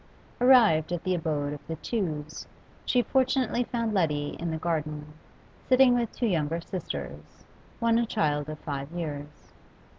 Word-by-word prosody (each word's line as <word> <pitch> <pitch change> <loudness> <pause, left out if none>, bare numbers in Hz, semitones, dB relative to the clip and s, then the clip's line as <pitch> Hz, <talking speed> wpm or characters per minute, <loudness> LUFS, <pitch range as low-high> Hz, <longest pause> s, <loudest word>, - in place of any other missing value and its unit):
Arrived 225 -12 +6
at 175 -1 -2
the 185 - 0
abode 150 -4 -1
of 145 - -7
the 160 - -3
Tews, 160 -6 -4 0.4
she 245 -1 +3
fortunately 260 -1 +1
found 230 -2 -2
Letty 150 -6 +1
in 170 +1 -2
the 160 - -2
garden, 150 -2 -3 0.6
sitting 255 -1 +6
with 240 -2 0
two 245 - -2
younger 165 -5 0
sisters, 75 - -7 0.3
one 230 0 +3
a 235 - 0
child 150 -8 0
of 155 - -5
five 140 -1 -5
years. 150 -3 -6
165 Hz, 150 wpm, -27 LUFS, 150-230 Hz, 0.6 s, Arrived